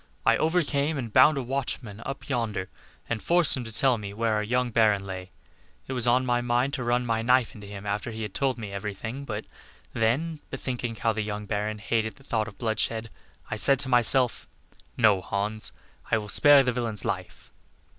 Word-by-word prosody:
I - - +5
overcame 155 -2 +1
and 120 -5 -5
bound 140 +3 +6
a 135 - -1
watchman 120 -4 -4
up 135 0 -6
yonder, 110 -8 -2 0.4
and 115 -2 -2
forced 175 -3 +4
him 130 - -4
to 115 - -6
tell 125 +1 +2
me 100 -1 -7
where 115 0 0
our 105 - +1
young 125 +3 0
Baron 105 -3 +3
lay. 95 -1 -6 0.6
It 130 - -5
was 125 -2 0
on 125 +2 +3
my 120 -1 +1
mind 120 +3 +1
to 130 -3 -2
run 120 +1 +1
my 115 -1 0
knife 125 +1 +3
into 105 -2 -11
him 100 0 -8
after 105 +3 -2
he 110 -1 -5
had 105 -2 -6
told 135 -3 0
me 105 -3 -6
every 100 +1 -4
thing, 120 +7 -6
but 110 -4 -5 0.5
then, 140 +8 0
bethinking 125 -3 -4
how 110 +1 0
the 110 - -2
young 105 0 -4
Baron 105 +1 -2
hated 110 +1 -1
the 135 - -19
thought 110 -4 -1
of 110 - -11
bloodshed, 110 -1 -1 0.4
I 110 - -2
said 140 +5 +5
to 130 - -3
myself, 125 0 +2 0.5
'No, 105 -5 +4
Hans, 105 +3 -2 0.4
I 115 - +3
will 105 -1 -5
spare 145 +2 +7
the 125 - +1
villain's 115 -4 0
life. - - -5
115 Hz, 205 wpm, -26 LUFS, 105-130 Hz, 0.6 s, spare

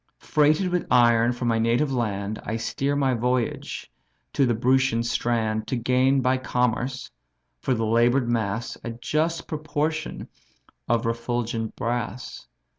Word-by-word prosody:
Freighted 155 +5 +2
with 180 0 -1
iron 120 -1 +5
from 120 0 -3
my 115 -1 +2
native 120 +5 +1
land, 105 -3 -2
I 110 - -3
steer 140 +5 -1
my 135 -2 +2
voyage 125 0 -2 0.4
to 135 - +3
the 120 - +2
Brutian 130 0 +2
strand 110 -2 -1
To - - -1
gain 130 +3 +2
by 130 +1 +2
commerce, 125 +1 -1 0.5
for 130 - 0
the 115 -1 -1
labour'd 120 +3 +3
mass, 115 -1 -2
A - - -4
just 155 +8 -1
proportion 155 +1 -3 0.6
of 115 -1 +2
refulgent 115 -1 -2
brass. 120 -1 -4
120 Hz, 135 wpm, -25 LUFS, 115-135 Hz, 0.6 s, iron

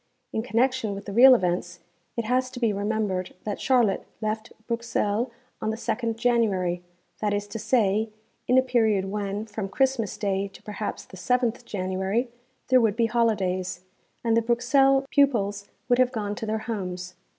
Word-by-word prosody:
In 220 - 0
connection 240 -2 0
with 200 - -8
the 200 - -6
real 255 +4 +9
events, 180 -3 -1 0.4
it 235 - -1
has 255 +2 +1
to 250 - -8
be 230 -4 +2
remembered 200 -2 -2
that 210 -2 -4
Charlotte 245 -7 +2
left 215 0 -3
Bruxelles 235 -1 -1 0.3
on 220 - -1
the 220 - -1
2nd 230 0 -2
January, 215 -7 +1 0.4
that 205 -1 0
is 205 0 -2
to 225 - -5
say, 215 -2 +2 0.4
in 250 - +4
a 260 - +6
period 220 -6 +2
when, 205 0 -3
from 210 -2 -5
Christmas 260 -2 0
day 200 -1 -1
to 195 - -16
perhaps 210 0 -5
the 190 - -13
7th 245 +5 0
January, 190 +5 -1 0.4
there 255 -1 +6
would 220 -3 +2
be 230 0 +2
holidays, 190 -6 0 0.4
and 230 -1 +2
the 230 - +4
Bruxelles 270 +4 +3
pupils 205 -8 +2 0.2
would 245 0 +3
have 255 -1 +4
gone 210 -4 -3
to 225 +1 -5
their 220 +1 0
homes. 180 -5 -4
220 Hz, 170 wpm, -26 LUFS, 200-240 Hz, 0.4 s, real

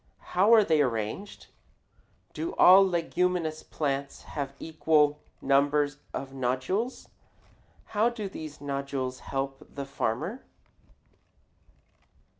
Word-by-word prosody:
How 195 +5 +4
are 220 - +6
they 160 -5 +3
arranged? 120 - -3 0.9
Do 335 +2 -4
all 185 +2 +8
leguminous 175 -3 0
plants 140 -2 -3
have 140 -2 -5
equal 155 -2 +2 0.2
numbers 145 +1 +2
of 135 0 -6
nodules? 135 - -2 0.9
How 220 +3 +3
do 225 -4 -5
these 155 -5 -8
nodules 140 -2 -3
help 135 0 -4
the 140 -1 -4
farmer? 140 - -3
150 Hz, 95 wpm, -28 LUFS, 135-180 Hz, 0.9 s, all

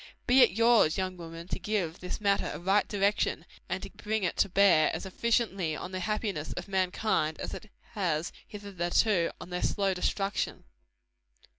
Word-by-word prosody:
Be 255 +2 +6
it 245 - +7
yours, 230 -6 +4
young 185 -1 -2
women, 165 0 -9
to - - -3
give 180 -3 -2
this 180 - -5
matter 200 -2 +1
a - - -5
right 195 +4 +2
direction, 200 0 0 0.2
and - - -3
to - - -7
bring 215 -1 -3
it 175 - 0
to - - +3
bear 180 -5 +5
as - - -5
efficiently 195 -5 0
on 180 - -6
the 185 - -3
happiness 200 -5 -2
of 180 - -6
mankind, 185 -4 0
as - - -5
it 215 - -9 0.2
has 175 -7 -1 0.2
hitherto 200 -2 0
on 180 - -10
their 180 - -2
slow 195 -1 +1
destruction. 195 +2 -2
190 Hz, 170 wpm, -29 LUFS, 175-210 Hz, 0.2 s, it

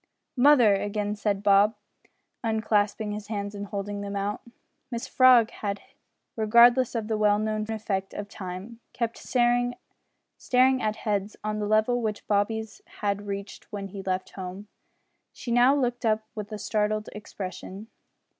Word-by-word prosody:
"Mother!" 250 -5 +6
again 205 +1 -1
said 205 -1 -1
Bob, 205 +2 +5 0.7
unclasping 215 -1 0
his 210 -1 -6
hands 205 -1 -4
and 205 0 -6
holding 200 0 -4
them 200 0 -5
out. 200 +1 -2 0.5
Mrs 240 +2 -4
Frog 250 -3 +6
had 200 -1 -3
hitherto, - - -24 0.4
regardless 235 +3 +5
of 225 -2 -2
the 220 -1 -1
well 205 -1 +4
known 215 0 -2
effect 205 -3 -3
of 205 - -5
time, 195 +3 -8
kept 235 -1 -2
staring 245 0 +1 1.1
at 215 0 0
heads 205 -2 -2
on 215 0 -2
the 210 - -2
level 220 +3 +2
which 215 -2 -3
Bobby's 215 +1 -1 0.2
had 205 0 -1
reached 200 0 -7
when 200 -2 -5
he 195 0 -7
left 185 -1 -3
home. 190 +2 -7 0.7
She 240 - -6
now 245 +3 +5
looked 245 -3 -1
up 215 -1 +1
with 210 -2 -7
a 215 - -4
startled 215 0 -1
expression. 195 -1 -7
210 Hz, 150 wpm, -26 LUFS, 200-225 Hz, 1.1 s, Mother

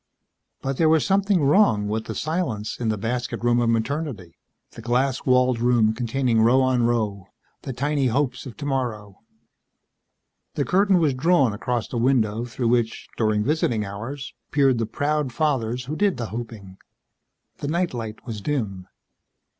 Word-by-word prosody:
But 135 0 -2
there 160 -2 +4
was 160 -1 +3
something 195 -3 +2
wrong 140 - +4
with 110 +1 -2
the 110 - -5
silence 155 - -2
in 115 -2 -1
the 110 - 0
"basket 120 +3 -3
room" 120 0 +3
of 120 -1 +2
Maternity, 115 - -2 0.4
the - - -11
glass 125 +4 0
walled 125 -1 +3
room 120 -2 +3
containing 120 0 0
row 120 +4 +5
on 130 -2 +2
row, 105 -5 -1 0.3
the - - -5
tiny 140 +2 0
hopes 125 +1 -1
of 120 - -10
tomorrow. 125 -8 -3 1.4
The - - 0
curtain 195 0 +3
was 155 -5 +2
drawn 135 -3 +3
across 120 +2 -2
the 120 - -5
window 115 -3 +1
through 120 0 -2
which, 120 -2 0
during 110 -2 +1
visiting 120 -6 0
hours, 115 +8 -6 0.2
peered 135 -4 +3
the 115 - -1
proud 145 +2 -1
fathers 125 -4 -1
who 150 +4 -4
did 200 -3 +1
the 120 -2 -4
hoping. 110 -5 -7 0.8
The 145 - -5
night 170 +2 0
light 110 -3 -6
was 110 -4 -6
dim. 100 -9 -3
125 Hz, 160 wpm, -23 LUFS, 110-140 Hz, 1.4 s, row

